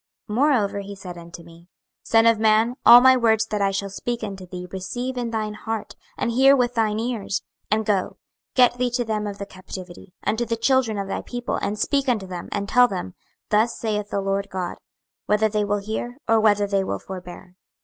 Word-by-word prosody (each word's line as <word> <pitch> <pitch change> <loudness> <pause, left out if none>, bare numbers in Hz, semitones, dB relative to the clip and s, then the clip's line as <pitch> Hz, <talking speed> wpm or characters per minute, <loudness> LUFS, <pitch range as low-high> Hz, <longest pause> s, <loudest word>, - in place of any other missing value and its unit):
26:003:010 - - -2
Moreover 240 -7 +2
he 200 0 -7
said 185 -2 -9
unto 170 0 -11
me, 170 +1 -16 0.3
Son 225 0 +3
of 230 -1 +4
man, 220 +2 +3
all 240 +1 +10
my 260 0 +7
words 225 -3 +3
that 210 -2 -3
I 200 - +3
shall 195 0 -3
speak 240 +3 -4
unto 195 -3 -6
thee 180 0 -7
receive 245 +7 -4
in 240 -2 -2
thine 215 -2 -2
heart, 220 +1 -5 0.2
and 235 - -1
hear 270 +3 +6
with 245 -2 +1
thine 220 -2 0
ears. 225 -4 -2 0.3
26:003:011 215 - +4
And 220 - -2
go, 200 -3 0 0.4
get 245 -1 +5
thee 250 0 +1
to 245 0 -1
them 215 -1 -2
of 200 -1 -6
the 200 - -5
captivity, 185 -1 -10
unto 225 +2 +1
the 230 0 -2
children 240 -2 +2
of 200 -1 -3
thy - - -3
people, 245 -1 -4
and 205 +1 -2
speak 275 +3 0
unto 215 -6 0
them, 180 -2 -7
and 200 -1 -2
tell 245 +3 +5
them, 180 - -5 0.4
Thus 215 +3 +2
saith 210 -2 -2
the 200 - -1
Lord 195 +1 -1
GOD; 185 -1 -4 0.5
whether 210 +1 +3
they 210 0 0
will 205 0 0
hear, 220 +4 -5
or 225 -1 +4
whether 205 -2 +3
they 200 -1 0
will 100 - -2
forbear. 180 - -10
215 Hz, 215 wpm, -23 LUFS, 195-235 Hz, 0.5 s, all